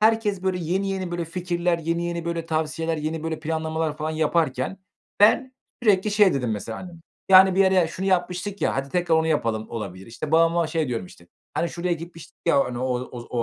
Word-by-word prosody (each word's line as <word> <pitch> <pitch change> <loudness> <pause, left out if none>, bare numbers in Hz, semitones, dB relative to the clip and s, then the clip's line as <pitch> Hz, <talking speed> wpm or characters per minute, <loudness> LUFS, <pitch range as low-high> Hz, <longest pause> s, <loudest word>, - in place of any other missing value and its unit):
Herkes, 215 -3 +2
böyle, 190 -1 0
yeni 185 +4 -1
yeni, 190 -2 -3
böyle, 175 -1 -2
fikirler, 175 0 -1
yeni 170 +1 -1
yeni, 170 -1 -3
böyle, 170 -1 -3
tavsiyeler, 160 +1 -1
yeni, 155 +1 -3
böyle, 160 -1 -3
planlamalar 160 -1 -2
falan 155 +1 -3
yaparken 155 0 0 0.4
ben 255 +5 +5 0.3
sürekli 210 -2 +3
şey 205 -4 +4
dedim, 125 -4 -1
mesela. 110 +1 -4
Hani, 180 -1 -9 0.4
yani, 190 0 +8
"Bir 190 - +3
yere 190 -3 +4
şunu 185 +3 -4
yapmıştık 185 +2 -1
ya, - - +1
hadi 135 +1 -2
tekrar 175 +1 +1
onu 160 0 +2
yapalım." 115 -8 -1
olabilir. 95 -5 -6
İşte, 120 +6 -6
babama 165 +1 +4
şey 160 -3 -1
diyorum, 115 -7 -3
işte: 85 -1 -17 0.3
"Hani, 170 - 0
şuraya 175 +1 -2
gitmiştik 165 0 -8
ya, 145 -5 +4
hani, 125 -1 -5
o 125 - -2 0.2
o 125 -1 -8 0.2
o - - +2
165 Hz, 200 wpm, -24 LUFS, 155-180 Hz, 0.4 s, yani